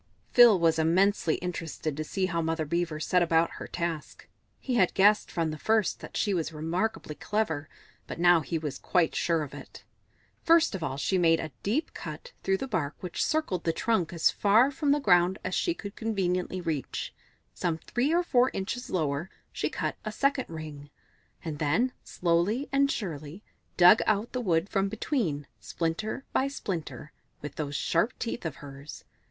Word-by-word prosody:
Phil 240 Hz, -5 st, +8 dB
was 165 Hz, -1 st, +3 dB
immensely 175 Hz, +1 st, +3 dB
interested 160 Hz, -3 st, -4 dB
to 155 Hz, -, -3 dB
see 190 Hz, +4 st, -1 dB
how 170 Hz, -2 st, -1 dB
Mother 160 Hz, -1 st, -1 dB
Beaver 170 Hz, 0 st, -1 dB
set 180 Hz, +3 st, +2 dB
about 165 Hz, -1 st, +3 dB
her -, -, -6 dB
task; 170 Hz, -4 st, -4 dB, 0.3 s
he 260 Hz, -, -3 dB
had 190 Hz, -7 st, +3 dB
guessed 205 Hz, +2 st, +4 dB
from 165 Hz, -2 st, -1 dB
the 155 Hz, -, -7 dB
first 220 Hz, -3 st, +1 dB
that -, -, -7 dB
she 205 Hz, -, +1 dB
was 170 Hz, -3 st, -1 dB
remarkably 165 Hz, +3 st, -2 dB
clever, 160 Hz, -6 st, -2 dB, 0.4 s
but -, -, -7 dB
now 175 Hz, -1 st, +6 dB
he 165 Hz, +1 st, -3 dB
was 150 Hz, -3 st, -5 dB
quite 175 Hz, -3 st, +1 dB
sure 165 Hz, -2 st, +1 dB
of 145 Hz, -, -9 dB
it. -, -, -11 dB, 0.6 s
First 330 Hz, -4 st, +4 dB
of 190 Hz, -, -4 dB
all 135 Hz, -4 st, -3 dB
she 185 Hz, +6 st, +1 dB
made 165 Hz, -2 st, +4 dB
a 155 Hz, -, -5 dB
deep 275 Hz, +11 st, -1 dB
cut -, -, -8 dB
through 195 Hz, 0 st, +1 dB
the 270 Hz, -, -4 dB
bark 165 Hz, -, -2 dB
which 180 Hz, -2 st, -2 dB
circled 310 Hz, -, -1 dB
the 165 Hz, -, +1 dB
trunk 185 Hz, -5 st, 0 dB
as 170 Hz, -2 st, +3 dB
far 225 Hz, +7 st, +4 dB
from 285 Hz, +1 st, -1 dB
the 290 Hz, -, +3 dB
ground 180 Hz, -6 st, +4 dB
as 185 Hz, -, -3 dB
she 345 Hz, -, 0 dB
could 200 Hz, -7 st, -8 dB
conveniently 185 Hz, -4 st, -1 dB
reach. 160 Hz, -5 st, -3 dB, 0.4 s
Some 160 Hz, -, -1 dB
three 245 Hz, -, -1 dB
or 345 Hz, +2 st, +3 dB
four 255 Hz, -6 st, +3 dB
inches 235 Hz, +6 st, -4 dB
lower 155 Hz, 0 st, -1 dB, 0.2 s
she -, -, -1 dB
cut -, -, -3 dB
a 215 Hz, -, -4 dB
second 275 Hz, +3 st, +1 dB
ring, 155 Hz, -3 st, -8 dB, 0.6 s
and 155 Hz, -3 st, -4 dB
then, 225 Hz, -, +1 dB
slowly 180 Hz, +10 st, 0 dB
and 275 Hz, 0 st, +3 dB
surely, 165 Hz, -2 st, -5 dB, 0.3 s
dug 180 Hz, +5 st, +8 dB
out 215 Hz, +1 st, +1 dB
the 250 Hz, -, -1 dB
wood 170 Hz, -4 st, +1 dB
from 195 Hz, -1 st, 0 dB
between, 205 Hz, -, -2 dB
splinter 170 Hz, -, -3 dB
by 270 Hz, -, +2 dB
splinter, 170 Hz, -, -5 dB, 0.3 s
with 145 Hz, -1 st, -5 dB
those 145 Hz, -2 st, -3 dB
sharp 170 Hz, -, 0 dB
teeth 230 Hz, -6 st, -3 dB
of 155 Hz, -, -6 dB
hers. 140 Hz, +1 st, -10 dB
175 Hz, 180 wpm, -28 LUFS, 160-220 Hz, 0.6 s, Phil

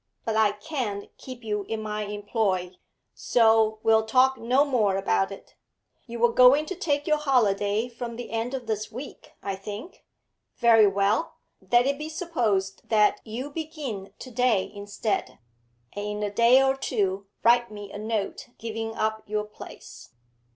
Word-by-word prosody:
But 225 Hz, -, -1 dB
I 215 Hz, -2 st, +3 dB
can't 210 Hz, -5 st, -5 dB
keep 255 Hz, -2 st, -10 dB
you 210 Hz, -2 st, -2 dB
in 225 Hz, +2 st, -3 dB
my 210 Hz, 0 st, -3 dB
employ, 205 Hz, -3 st, -1 dB, 0.4 s
so 220 Hz, -2 st, +3 dB
we'll 220 Hz, 0 st, +4 dB
talk 260 Hz, +3 st, +4 dB
no 260 Hz, +4 st, +2 dB
more 220 Hz, -9 st, +2 dB
about 100 Hz, -, +1 dB
it. -, -, -11 dB, 0.5 s
You 235 Hz, -, -6 dB
were 235 Hz, 0 st, +3 dB
going 260 Hz, +4 st, +6 dB
to 380 Hz, -, -5 dB
take 295 Hz, -5 st, -1 dB
your 305 Hz, -1 st, +2 dB
holiday 220 Hz, -6 st, +2 dB
from 235 Hz, -1 st, -7 dB
the 240 Hz, +1 st, -7 dB
end 230 Hz, +3 st, -2 dB
of 255 Hz, -2 st, -6 dB
this 215 Hz, -1 st, -3 dB
week, 255 Hz, +5 st, -9 dB
I 195 Hz, -1 st, -2 dB
think? 210 Hz, -, -9 dB, 0.5 s
Very 225 Hz, -3 st, +6 dB
well, 200 Hz, +10 st, +1 dB, 0.4 s
let 240 Hz, +1 st, +5 dB
it 280 Hz, +1 st, 0 dB
be 305 Hz, +1 st, -5 dB
supposed 235 Hz, -, -1 dB
that 210 Hz, -2 st, +3 dB
you 245 Hz, +6 st, -6 dB
begin 290 Hz, -, -6 dB
to 255 Hz, -, -10 dB
day 240 Hz, -5 st, +1 dB
instead, 205 Hz, +1 st, -3 dB, 0.6 s
and 205 Hz, 0 st, -4 dB
in 210 Hz, 0 st, -3 dB
a 205 Hz, -, -1 dB
day 235 Hz, +5 st, +5 dB
or 270 Hz, 0 st, +2 dB
two 195 Hz, -7 st, -1 dB, 0.2 s
write 240 Hz, 0 st, +4 dB
me 205 Hz, -2 st, -9 dB
a 205 Hz, -, -7 dB
note 215 Hz, +3 st, -3 dB
giving 225 Hz, 0 st, -5 dB
up 220 Hz, 0 st, -1 dB
your 210 Hz, 0 st, -1 dB
place.' 210 Hz, -, -12 dB
225 Hz, 165 wpm, -26 LUFS, 205-255 Hz, 0.6 s, going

